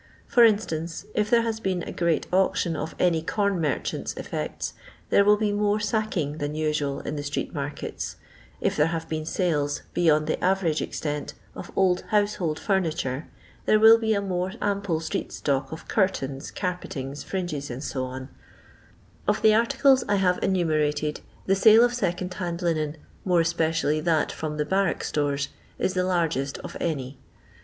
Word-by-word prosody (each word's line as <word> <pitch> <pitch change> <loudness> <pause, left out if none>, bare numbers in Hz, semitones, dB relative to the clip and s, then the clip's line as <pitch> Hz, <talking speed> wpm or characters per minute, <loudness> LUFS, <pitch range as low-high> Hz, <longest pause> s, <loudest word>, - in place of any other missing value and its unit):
For 245 -4 +5
instance, 175 -7 +1
if 210 0 0
there 235 0 +4
has 225 -1 -2
been 185 -5 -1
a - - -6
great 170 -2 0
auction 185 -3 +2
of 155 +2 -4
any 170 -3 +2
corn 200 +1 0
merchant's 150 -4 -2
effects, - - -4 0.4
there 200 - +6
wUl 210 +1 +5
be 210 -1 0
more 205 0 +1
sack 215 0 -1
ing 150 -1 -2
than 145 +1 -3
usual 150 -3 -1
in 150 - -4
the - - -2
street 145 0 -3
markets; 145 0 -4 0.4
if - - 0
there 150 +1 +3
have 165 0 -3
been 155 -1 -3
sales, 150 -5 0
beyond 155 -3 +3
the - - -2
average 180 -4 +2
extent, 150 -1 -4 0.2
of - - -8
old 185 -2 +3
household 205 -7 +1
furniture, 160 -8 -1 0.4
there 215 - +5
will 225 +1 +8
be 220 -1 +1
a 200 - 0
more 185 -1 -2
ample 200 -5 0
street 160 - -3
stock 135 -1 -1
of 160 - -8
curtains, 140 -10 0
carpeting, 150 -7 -4
fringes, 155 -2 -4
&c. 130 +1 -5 1.3
Of - - +1
the 215 - +7
articles 265 +3 +4
I 205 - +4
have 185 -2 +2
enumerated 155 -5 +1 0.2
the 195 - +3
sale 220 +4 +7
of 245 0 +3
second 185 -5 -2
hand 175 -1 -4
linen, 155 -2 0 0.3
more 180 -3 +3
especially 165 -2 +1
that 160 -1 +1
from 155 -1 -4
the 150 - 0
barrack 190 +1 +1
stores, 145 -1 -1 0.3
is 185 - 0
the 185 -1 +1
largest 165 -7 0
of - - -9
any. 135 -5 -3
170 Hz, 165 wpm, -25 LUFS, 150-200 Hz, 1.3 s, will